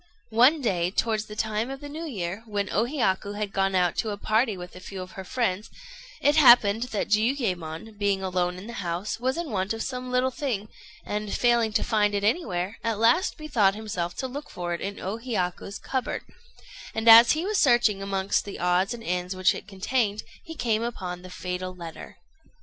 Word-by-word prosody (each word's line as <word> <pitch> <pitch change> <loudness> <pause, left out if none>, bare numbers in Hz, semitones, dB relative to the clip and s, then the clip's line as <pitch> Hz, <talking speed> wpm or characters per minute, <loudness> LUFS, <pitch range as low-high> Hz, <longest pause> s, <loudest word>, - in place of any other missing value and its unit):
One 255 +8 +5
day, 180 -8 +1
towards 215 +2 0
the 210 - -9
time 220 +2 -1
of 270 0 -6
the 290 - -8
New 310 +3 -6
Year, 195 - -4
when 205 -2 -2
O 220 - +2
Hiyaku 210 -7 -1
had 205 -1 -4
gone 195 -1 +1
out 180 -2 +2
to 225 - 0
a 205 - -3
party 220 0 +1
with 180 0 -9
a - - -9
few 190 +1 -8
of 185 0 -7
her 190 - -8
friends, 210 -1 -2 0.5
it 290 +2 +3
happened 240 -5 +6
that 220 -5 -3
Jiuyémon, 210 - -1
being 200 -2 +1
alone 180 -1 -1
in 185 - -9
the 235 - -8
house, 175 +5 -3
was 260 +4 -1
in 340 -4 -4
want 190 0 -1
of 225 - -3
some 255 -1 -5
little 250 +1 +1
thing, 230 -7 -3 0.4
and, 210 0 -3
failing 235 -2 +2
to - - +2
find 210 -3 +1
it 200 - -1
anywhere, 205 - -1
at 225 -2 0
last 235 - +3
bethought 235 - +2
himself 185 -5 -4
to 260 - -3
look 285 +3 -7
for 175 -1 -4
it 170 - -4
in 200 +1 -4
O 195 +4 -3
Hiyaku's 200 -5 -3
cupboard; 260 -2 -3 0.7
and 220 +1 -2
as 230 +1 +10
he 315 +3 -2
was 420 0 +1
searching 240 -7 +4
amongst 195 0 0
the 200 - -7
odds 180 +4 +1
and 230 - -11
ends 180 0 -2
which 185 +2 +3
it 195 - -8
contained, 210 +1 -1 0.2
he 325 - -9
came 225 -6 0
upon 185 -7 -4
the 185 - -11
fatal 180 0 -5
letter. 170 -2 -9
210 Hz, 205 wpm, -26 LUFS, 185-240 Hz, 0.7 s, as